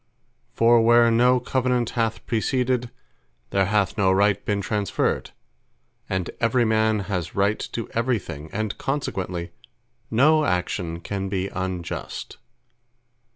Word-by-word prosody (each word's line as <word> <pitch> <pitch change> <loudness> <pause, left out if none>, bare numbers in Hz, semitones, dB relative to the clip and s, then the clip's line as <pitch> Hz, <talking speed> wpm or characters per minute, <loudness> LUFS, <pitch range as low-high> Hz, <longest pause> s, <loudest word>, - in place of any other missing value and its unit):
For 115 0 +5
where 120 0 +5
no 125 +2 +4
Covenant 125 -1 0
hath 115 -2 -1
preceded, 125 +2 0 0.6
there 95 -1 +2
hath 105 0 0
no 95 -2 +4
Right 100 +1 +2
been 105 -1 -1
transferred, 100 0 -1 0.8
and 95 -2 -2
every 120 +1 +2
man 110 -1 +2
has 90 -5 -4
right 100 +2 +1
to 115 - -3
every 115 +1 0
thing; 75 -5 -8
and 110 0 -2
consequently, 90 -11 -3 0.6
no 155 +7 +4
action 90 - -2
can 95 +1 -4
be 95 0 -2
Unjust. 95 -2 -5
105 Hz, 120 wpm, -24 LUFS, 95-120 Hz, 0.8 s, For